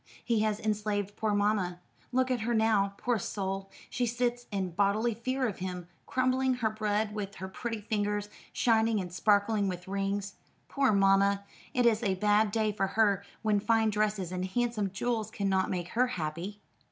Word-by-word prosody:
He 230 -3 +2
has 215 -1 +1
enslaved 210 -2 -1
poor 215 -1 0
mamma. 205 -4 +1 0.3
Look 260 +1 +1
at 250 - +1
her 235 +2 0
now, 210 -3 +2
poor 245 -3 0
soul; 195 0 -3 0.2
she 245 -1 -1
sits 240 +1 -1
in 190 -3 -2
bodily 205 +6 +2
fear 255 +4 -1
of 205 - -5
him, 180 -1 -5 0.2
crumbling 255 0 +2
her 225 -3 0
bread 215 0 -1
with 200 -2 -5
her 190 - -6
pretty 225 +3 -4
fingers, 205 -1 -1 0.2
shining 225 -2 +2
and 180 -2 -5
sparkling 205 +2 +2
with 180 -1 -5
rings. 200 +1 -2 0.4
Poor 275 -3 +2
mamma! 200 0 +4 0.3
it 250 -1 +3
is 225 -1 +4
a 195 -5 +1
bad 210 +2 +3
day 215 0 +1
for 195 -2 0
her 200 -1 +2 0.2
when 210 -2 +3
fine 220 +1 +2
dresses 210 -4 0
and 185 0 -2
handsome 220 0 -1
jewels 220 +3 -2
cannot 190 -2 0
make 175 -1 -3
her 250 +5 +2
happy." 180 +1 -4
210 Hz, 175 wpm, -30 LUFS, 195-225 Hz, 0.4 s, mamma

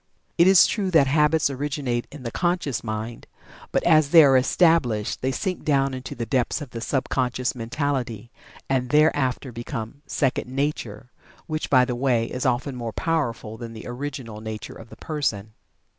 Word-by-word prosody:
It 170 - +5
is 190 -2 +8
true 200 -4 -1
that 160 -6 +5
Habits 150 +1 +2
originate 135 -3 -2
in 145 -3 -10
the 115 - -4
conscious 175 -5 -1
mind, 110 +1 -5 0.4
but - - +1
as 155 -4 +4
they 165 0 +8
are 135 -2 +5
established 130 - +2
they 130 - 0
sink 185 +7 -3
down 135 -2 +1
into 130 0 -6
the 120 - -4
depths 125 +4 0
of 145 -5 -8
the 115 - -6
sub 135 +2 -1
conscious 125 -1 0
mentality, 125 -2 -3 0.4
and 130 -2 0
thereafter 145 -3 +2
become 120 +2 -6
"second 130 -3 0
nature," 130 -5 -3 0.3
which, 155 -1 -3
by 130 -2 +5
the 125 - -3
way, 120 -2 +1
is 125 +2 -2
often 130 +2 -1
more 115 -2 -5
powerful 120 -9 -2
than 115 0 -8
the 110 - -9
original 125 -4 -6
nature 110 -1 -6
of 115 - -12
the - - -13
person. 110 -9 -3
130 Hz, 175 wpm, -24 LUFS, 120-150 Hz, 0.4 s, is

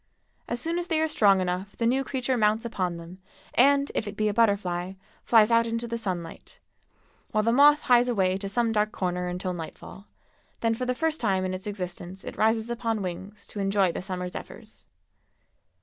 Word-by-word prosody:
As 240 - -2
soon 335 +5 -1
as 350 - -4
they 325 -3 +1
are 320 - +2
strong 200 -10 +4
enough 185 +2 -3
the 230 - 0
new 260 +3 +2
creature 260 -1 -1
mounts 220 0 +2
upon 185 -6 -2
them 170 +2 -11 0.3
and, 280 +2 +4
if 220 - -2
it 205 0 -7
be 215 - +1
a - - -1
butterfly, 195 -5 +1 0.3
flies 225 -1 +5
out 230 0 +4
into 230 +1 -2
the 235 - -3
sunlight; 185 -7 -6 0.7
while 215 -1 +1
the 230 - +2
moth 290 +4 +6
hies 245 0 +4
away 190 -5 +1
to 195 0 -5
some 235 +2 +1
dark 215 -1 +1
corner 180 -2 -2
until 180 +1 -3
nightfall, 175 +4 -9 0.5
then 230 -1 +2
for 250 +2 -3
the 250 - 0
first 320 +3 -1
time 190 -4 +1
in 185 - -2
its 185 +2 -6
existence 185 -2 -6
it - - -7
rises 220 +1 +1
upon 230 -3 -2
wings 190 +3 -7
to 205 - -8
enjoy 195 -2 +2
the - - -5
summer 180 -1 -4
zephyrs. 215 +4 -10
215 Hz, 195 wpm, -26 LUFS, 185-235 Hz, 0.7 s, moth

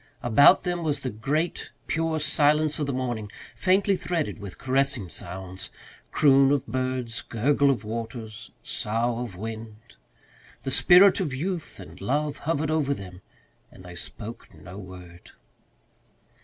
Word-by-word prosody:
About 140 +10 +6
them 175 -1 -2
was 155 -3 -1
the 130 - -2
great, 145 +11 -2 0.2
pure 165 -1 -1
silence 150 +1 +2
of 145 - -1
the - - 0
morning, 120 -5 -3 0.2
faintly 195 +1 +3
threaded 170 -9 -2
with 100 -3 -8
caressing 135 -6 0
sounds 95 +2 -7 0.4
croon 135 -2 +5
of 145 -3 +1
birds, 130 -2 -2
gurgle 140 +5 +2
of 130 -6 0
waters, 110 0 -6
sough 115 +2 -1
of 120 -6 -5
wind. 110 +2 -7 0.9
The 135 - -2
spirit 180 +7 +7
of 155 -9 -2
youth 175 +4 -4
and - - -12
love 145 +2 -1
hovered 155 -1 0
over 145 -3 +1
them 90 -3 -10 0.5
and 95 - -14
they 90 -1 -10
spoke 110 +6 -7
no 85 +5 -11
word. 90 -2 -12
130 Hz, 140 wpm, -26 LUFS, 110-150 Hz, 0.9 s, spirit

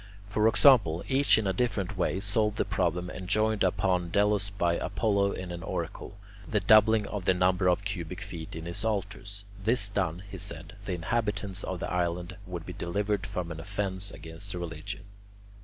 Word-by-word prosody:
For 105 +1 +2
example, 115 - +5
each 135 -1 +5
in 110 - 0
a 95 - +1
different 105 -2 -1
way 95 0 0
solved 105 +1 +1
the - - +1
problem 90 -3 -1
enjoined 110 +3 +1
upon 90 -1 +1
Delos 100 +1 +2
by 85 -4 +1
Apollo 100 -3 +1
in 90 -1 -5
an 85 0 -5
oracle, 100 - -5 0.3
the 105 - +2
doubling 110 +2 +5
of 100 -3 -5
the 95 - +4
number 90 0 +2
of 95 +3 +1
cubic 90 -3 -4
feet 85 -8 -7
in 80 0 -6
his 85 +4 -3
altars; 100 -1 -3 0.2
this 110 -1 +2
done, 95 -3 -1
he 100 -2 -8
said, 80 +4 -5
the 95 - -2
inhabitants 100 +1 -2
of 95 - -3
the - - -4
island 90 0 -1
would 85 -2 -6
be 90 - -6
delivered 100 +3 -1
from 90 -4 -4
an 80 - -6
offence 100 +1 -1
against 80 +3 -6
religion. 85 +3 -6
95 Hz, 175 wpm, -29 LUFS, 90-105 Hz, 0.3 s, example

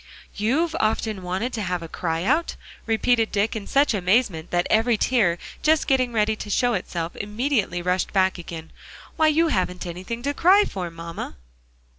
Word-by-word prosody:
"You've 305 +10 0
often 215 -2 0
wanted 185 +8 -3
to 220 - -3
have 180 -3 -2
a - - -6
cry 165 0 -2
out?" 305 - +1 0.3
repeated 225 0 +2
Dick, 205 +2 0
in 210 -2 -5
such 280 -2 +3
amazement 185 -3 +1
that 175 0 +1
every 225 +1 +3
tear 205 -8 +2 0.2
just 315 0 +3
getting 255 -2 +2
ready 220 -1 +1
to 210 - -7
show 245 +4 +2
itself 175 -3 -3
immediately 210 -4 -1
rushed 180 +1 0
back 190 -2 +2
again. 165 -2 -8 0.4
"Why, 315 - +3
you 320 +2 +3
haven't 180 -7 -1
anything 185 +7 -6
to 285 +2 0
cry 380 +7 +5
for, 180 -3 -5
mamma." 165 - -7
210 Hz, 170 wpm, -23 LUFS, 180-250 Hz, 0.4 s, cry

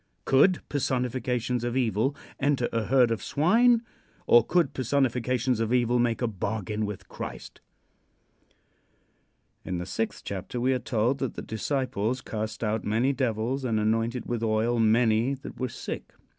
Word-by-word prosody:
Could 170 +7 +4
personifications 125 -3 -1
of 120 +1 -1
evil 120 +2 +1 0.2
enter 140 -3 +1
a 115 -1 0
herd 125 -1 +4
of 115 - -1
swine, 230 - +3 0.4
or 120 -1 +6
could 165 0 +1
personifications 125 -2 0
of 115 0 -1
evil 120 -1 +2
make 120 0 +1
a - - +2
bargain 105 0 -3
with 105 -2 -7
Christ? - - -8 2.0
In 90 - -3
the 90 - -4
sixth 110 +4 -3
chapter 100 +5 -5
we 130 +2 +2
are 130 - 0
told 120 +2 0
that 135 - -3
the - - -6
disciples 125 0 -2
"cast 110 +1 -4
out 110 0 -1
many 115 +6 +1
devils 125 +1 -1
and 115 -4 0
anointed 115 +2 0
with 120 -2 -2
oil 115 +1 +1
many 115 +3 +3
that 135 - -10
were 130 -1 -1
sick." - - -6
120 Hz, 150 wpm, -27 LUFS, 110-130 Hz, 2.0 s, or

